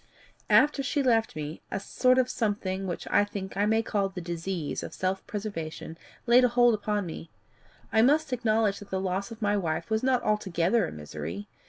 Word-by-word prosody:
"After 295 -1 +5
she 280 +1 0
left 225 -3 +2
me, 155 +1 -6
a - - -2
sort 255 +5 +2
of 255 -1 +3
something 200 -5 -2
which 175 - -5
I 205 - +5
think 200 -2 -6
I 205 +1 +1
may 220 +1 +2
call 200 -3 0
the 190 - -7
disease 170 -1 -4
of - - -7
self 190 +1 -1
preservation, 165 -7 -5 0.3
laid 245 +2 +6
hold 240 -1 +4
upon 210 -1 -1
me. 165 -1 -7 0.6
I 220 - +5
must 290 +3 +3
acknowledge 220 -4 +1
that 205 - -12
the 190 - -1
loss 190 +1 -2
of 225 -1 -8
my 205 0 +2
wife 170 +1 -2
was 220 0 +2
not 255 -2 +2
altogether 200 -1 +1
a - - -7
misery. 75 +6 -7
205 Hz, 190 wpm, -28 LUFS, 180-230 Hz, 0.6 s, laid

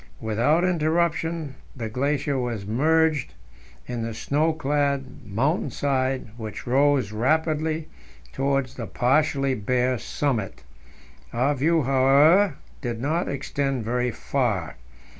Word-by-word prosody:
Without 120 +10 +1
interruption 165 -3 0 0.2
the 115 -4 -4
glacier 140 +4 -1
was 120 -5 -3
merged 155 +6 +1 0.5
in 120 -2 -4
the 115 -1 -4
snow 150 +7 +1
clad 140 -5 -1
mountain 135 - 0
side, 130 -3 -1
which 110 0 -7
rose 135 -3 +2
rapidly 155 +6 0 0.5
towards 135 -2 0
the 115 - -6
partially 135 +1 +1
bare 125 +2 0
summit. 110 - -2 0.7
Our 130 +5 +2
view, 155 +4 +2
however, 140 +7 +5 0.3
did 120 -4 -3
not 155 +8 0
extend 135 -3 -2
very 125 +2 0
far. 115 - -2
135 Hz, 110 wpm, -24 LUFS, 120-150 Hz, 0.7 s, however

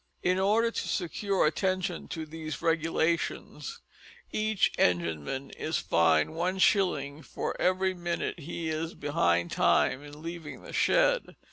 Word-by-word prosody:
In 180 +1 +2
order 220 +4 +3
to - - -3
secure 195 +1 0
attention 185 +2 -1
to 160 -1 -5
these 155 -1 -6
regulations, 165 - -1 0.5
each 215 -1 +1
engineman 85 - 0
is 160 - -2
fined 80 - +3
one 180 +3 -1
shilling 155 -7 +2
for - - -4
every 185 +1 +2
minute 175 -1 -3
he 165 +1 -4
is 160 +1 -3
behind 85 - +1
time 130 - +3
in 145 +1 -11
leaving 165 -2 -7
the - - -10
shed. - - +2
165 Hz, 130 wpm, -29 LUFS, 145-185 Hz, 0.5 s, order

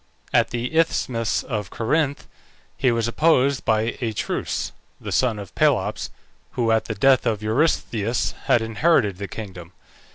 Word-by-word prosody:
At - - +4
the 120 +5 -4
isthmus 125 -8 +1
of 105 -6 -4
Corinth 145 +4 -1 0.5
he 130 -3 +2
was 115 -1 0
opposed 140 0 +2
by 110 +1 +1
Atreus, 110 -4 -2 0.3
the - - -6
son 120 -4 +2
of 100 -3 -9
Pelops, - - +1 0.4
who 115 -2 +1
at 110 0 +2
the 110 - -4
death 130 +4 +4
of 110 -2 -1
Eurystheus 115 -2 0
had 115 - +3
inherited 110 - +2
the 100 - -4
kingdom. 90 -6 -9
115 Hz, 140 wpm, -23 LUFS, 110-130 Hz, 0.5 s, At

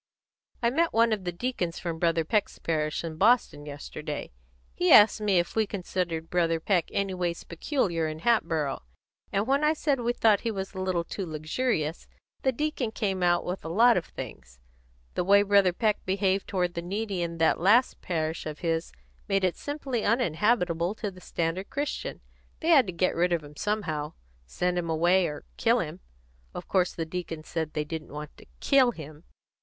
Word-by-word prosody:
"I 235 - +3
met 330 +5 +1
one 230 0 +4
of 200 -4 -3
the 175 - -1
deacons 175 -3 -3
from 165 -2 -4
Brother 165 -1 +2
Peck's 210 +4 +1
last - - -27
parish, 155 -1 -1
in 160 -2 -5
Boston, 205 -8 +3
yesterday. 145 +1 -6 0.4
He 180 - +1
asked 215 +1 +7
me 205 -3 +2
if 175 0 0
we 220 -1 +2
considered 175 -4 -3
Brother 165 -2 +2
Peck 175 0 +1
anyways 180 -3 -2
peculiar 170 - -1
in 155 0 -6
Hatboro', 160 - +1 0.5
and 200 +2 +1
when 275 +4 +2
I 305 +1 +4
said 290 -3 0
we 240 0 +1
thought 215 -4 +4
he 230 - -2
was 195 -2 -4
a 190 - -6
little 185 -2 0
too 195 - -5
luxurious, 155 +1 -2 0.3
the 265 - +2
deacon 290 -3 -2
came 200 -4 -2
out 175 -1 +2
with 180 +2 -4
a 160 - -5
lot 230 +7 +5
of 175 - 0
things. 65 -1 -9 0.5
The - - 0
way 200 +2 +5
Brother 200 -2 +4
Peck 210 +3 0
behaved 190 0 0
toward 180 -3 -1
the 170 - -3
needy 195 +1 -3
in 170 -1 -3
that 160 -1 +3
last 215 +9 +3
parish 160 -2 -2
of 155 -1 -5
his 165 -1 -1 0.4
made 195 -1 +1
it 185 -2 +2
simply 275 -6 -3
uninhabitable 185 -4 +1
to 210 -2 -4
the 185 -1 -15
standard 170 +4 -2
Christian. 285 +2 -4 0.4
They 325 - -1
had 275 -9 +6
to - - -2
get 185 +1 +1
rid 175 +1 +1
of 165 -3 0
him 145 0 -12
somehow 160 -7 -2 0.3
send 180 - -1
him 170 -1 -4
away 175 +3 +3
or 150 - -7
kill - - +3
him. - - -4 0.6
Of - - -6
course 185 -2 +2
the 165 - -4
deacon 165 -2 -5
said 160 -1 -4
they 150 -1 -1
didn't 160 0 -6
want 150 0 -7
to - - -16
kill 265 -3 +4
him." 155 -1 -11
180 Hz, 190 wpm, -27 LUFS, 165-215 Hz, 0.6 s, asked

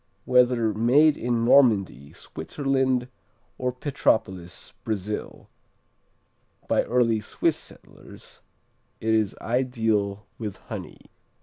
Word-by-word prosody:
Whether 125 -3 +3
made 140 +7 +4
in 120 -1 -1
Normandy, 100 - +3
Switzerland, 130 - -1 0.5
or 125 0 0
Petropolis, 110 - -2
Brazil, 105 -1 -4 1.2
by - - +3
early 115 -2 +2
Swiss 105 - 0
settlers, - - -13 0.6
it 110 0 0
is 110 -3 +1
ideal 110 -5 -1
with 105 -4 -5
honey. - - -9
115 Hz, 90 wpm, -25 LUFS, 105-125 Hz, 1.2 s, made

